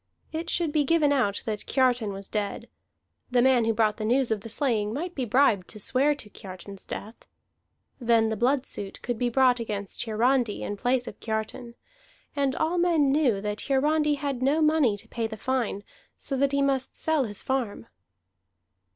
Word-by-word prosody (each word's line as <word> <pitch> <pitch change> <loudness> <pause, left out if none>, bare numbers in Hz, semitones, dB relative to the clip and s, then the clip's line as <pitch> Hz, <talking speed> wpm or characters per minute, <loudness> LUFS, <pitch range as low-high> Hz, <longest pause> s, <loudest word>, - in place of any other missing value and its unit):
It 325 +2 -4
should 335 -3 0
be 300 -1 +2
given 295 -1 +3
out 220 -8 0
that 215 -2 -4
Kiartan 250 -5 +2
was 195 0 -6
dead: 205 -2 -3 0.6
the 250 -1 +2
man 250 -2 +4
who 225 - +2
brought 215 -1 +2
the 220 - -4
news 245 +2 +2
of 215 -2 0
the 225 - -8
slaying 220 -4 0
might 340 +9 -4
be 260 -6 -2
bribed 230 -6 +3
to 215 - -9
swear 275 +7 +2
to 280 - -10
Kiartan's 195 -1 -11
death. 215 +2 -6 0.9
Then 230 -2 +3
the 220 - -1
blood 255 +5 +1
suit 195 -1 -5
could 240 -2 -3
be 245 - +1
brought 250 0 +4
against 205 -4 -4
Hiarandi 235 0 +1
in 205 - -3
place 245 +4 0
of - - -8
Kiartan; 225 +2 -4 0.6
and 275 -2 +1
all 330 +3 0
men 330 -6 +3
knew 265 -9 +2
that 210 0 -3
Hiarandi 300 +2 +2
had 280 -3 -3
no 280 +4 +2
money 305 -9 +3
to - - -12
pay 230 -1 -2
the 220 0 -8
fine, 235 -4 -1 0.3
so 275 - -3
that 275 +1 +2
he 280 0 +2
must 270 -1 0
sell 315 -4 +1
his 205 -3 -5
farm. 250 - -2
245 Hz, 185 wpm, -26 LUFS, 215-280 Hz, 0.9 s, man